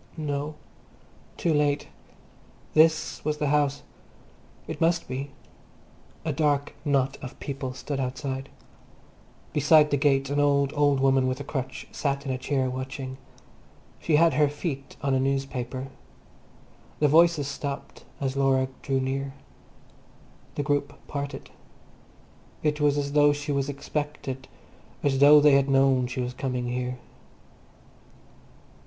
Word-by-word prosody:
No, 150 0 -3 0.8
too 165 - +1
late. 145 -1 +1 0.9
This 160 0 +3
was 150 0 -1
the 150 -2 0
house. 145 -1 +1 0.8
It - - -6
must 170 +1 +2
be. 135 +2 -4 1.0
A 155 - 0
dark 145 -1 +1
knot 135 -2 +1
of 130 - -9
people 135 -2 -5
stood 140 +1 -4
outside. 135 +1 -3 1.0
Beside 150 +1 +5
the 145 - +3
gate 135 -1 +2
an 145 - +1
old, 140 -1 +2
old 145 -2 +3
woman 135 -1 +3
with 130 +1 -2
a - - -4
crutch 135 -2 -5
sat 140 -1 -2
in 135 - -2
a 130 - -1
chair, 135 -1 0
watching. 130 +1 -5 0.8
She 160 - +1
had 165 +2 +5
her 150 -1 +3
feet 145 -2 -5
on 140 -1 +1
a 130 - +3
newspaper. 135 -1 -2 1.1
The 150 - +3
voices 160 -1 +4
stopped 140 0 -6 0.2
as 135 -1 -2
Laura 135 -1 +2
drew 135 -1 0
near. 135 +1 -3 1.2
The 145 - -1
group 145 0 0
parted. 140 0 -5 1.1
It 150 -1 0
was 145 -1 +3
as 140 -1 -1
though 145 0 +5
she 145 +1 -4
was 140 0 0
expected, 145 -2 -4 0.6
as 135 -2 +2
though 145 +1 +9
they 145 0 +6
had 140 0 +4
known 135 -2 +3
she 125 +1 -3
was 125 0 -3
coming 125 -2 -3
here. 125 0 -3
140 Hz, 135 wpm, -26 LUFS, 135-145 Hz, 1.2 s, though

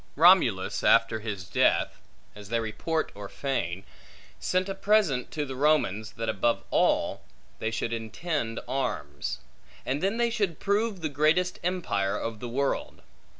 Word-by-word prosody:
Romulus, 150 - +4
after 110 - +4
his 105 -3 -5
death - - +1 0.3
(as 105 -1 -11
they 115 0 +1
report 115 +9 -2
or 100 -1 -8
feign), 95 -10 -2 0.6
sent 185 +1 0
a 195 - -2
present 195 -13 +2
to 150 -2 -3
the 135 -1 -6
Romans, 130 -7 +1
that 115 0 -4
above 110 +2 +1
all, - - +2 0.4
they 110 - -1
should 115 +1 -2
intend 115 +2 -3
arms; 75 - -3 0.4
and 140 +3 -1
then 195 +4 0
they 235 0 +2
should 200 -8 -1
prove 205 -1 0
the 160 - 0
greatest 155 +5 +2
empire 135 - 0
of 115 -1 -4
the 120 - -5
world. 135 +3 -2
135 Hz, 150 wpm, -28 LUFS, 110-175 Hz, 0.6 s, Romulus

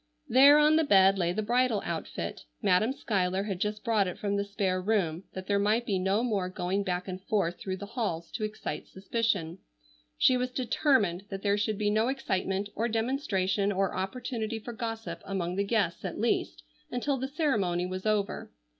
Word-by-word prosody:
There 280 +4 +8
on 300 +1 +5
the 320 - +4
bed 195 -6 +5
lay 175 -1 +1
the 215 +4 -2
bridal 240 -1 +2
outfit. 125 - -4 0.2
Madam 200 +7 +3
Schuyler 195 -8 0
had 195 -3 -4
just 210 +1 -2
brought 220 -5 +2
it 180 - -5
from 200 -1 -1
the 200 - +1
spare 200 -2 -1
room 185 -4 0
that 185 0 -6
there 200 0 +1
might 215 +4 +2
be 195 -4 0
no 195 +5 +1
more 200 -7 0
going 185 +2 -1
back 180 -1 -2
and 185 0 -5
forth 180 -5 0
through 190 -1 -4
the 205 - -7
halls 200 -7 -3
to 220 - -4
excite 215 0 -4
suspicion. 195 -4 -1 0.6
She 255 - +5
was 250 0 -1
determined 235 - +1
that 195 -1 -6
there 200 -1 +3
should 210 0 -1
be 205 0 +1
no 220 +2 +2
excitement 195 -7 -1
or 230 - 0
demonstration 215 -5 0
or 195 -1 0
opportunity 225 +3 -3
for 235 +2 -7
gossip 225 0 -5
among 180 -2 -3
the 200 - +1
guests 200 -5 0
at 185 -3 -4
least 235 - 0 0.3
until 270 +2 -1
the 265 +1 -3
ceremony 215 - 0
was 185 +3 -4
over. 210 -2 -1
205 Hz, 190 wpm, -29 LUFS, 185-230 Hz, 0.6 s, There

